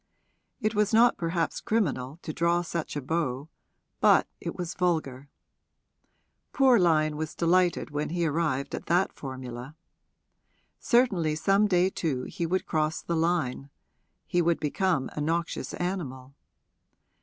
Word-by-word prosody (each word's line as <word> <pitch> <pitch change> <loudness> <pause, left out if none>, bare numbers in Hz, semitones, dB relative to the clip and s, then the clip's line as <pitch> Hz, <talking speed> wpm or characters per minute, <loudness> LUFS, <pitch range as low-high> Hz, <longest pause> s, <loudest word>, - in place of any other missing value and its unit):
It 215 -3 0
was 210 0 +2
not 240 +2 +6
perhaps 165 0 -2
criminal 150 - -1
to 155 - -5
draw 170 +2 +1
such 165 -2 -4
a 145 - -3
bow, 145 -2 -2 0.5
but - - +5
it - - -5
was 175 -2 -4
vulgar: 150 -7 -1 1.2
poor 260 -4 +5
Lyon 155 -4 +2
was 155 0 -4
delighted 175 -1 +2
when 150 +1 -2
he 170 +1 -1
arrived 150 -3 -1
at - - -5
that 175 +3 +2
formula. 130 0 -7 1.0
Certainly 195 - +2
some 195 +6 +3
day 185 -1 +2
too 140 -9 -2
he 170 - -4
would 185 +3 -1
cross 155 -1 -1
the 170 - -2
line 160 -5 0 0.6
he 175 - +1
would 170 0 +1
become 150 -2 0
a 150 - -4
noxious 165 +3 -2
animal. 140 -8 -4
165 Hz, 135 wpm, -27 LUFS, 145-180 Hz, 1.2 s, not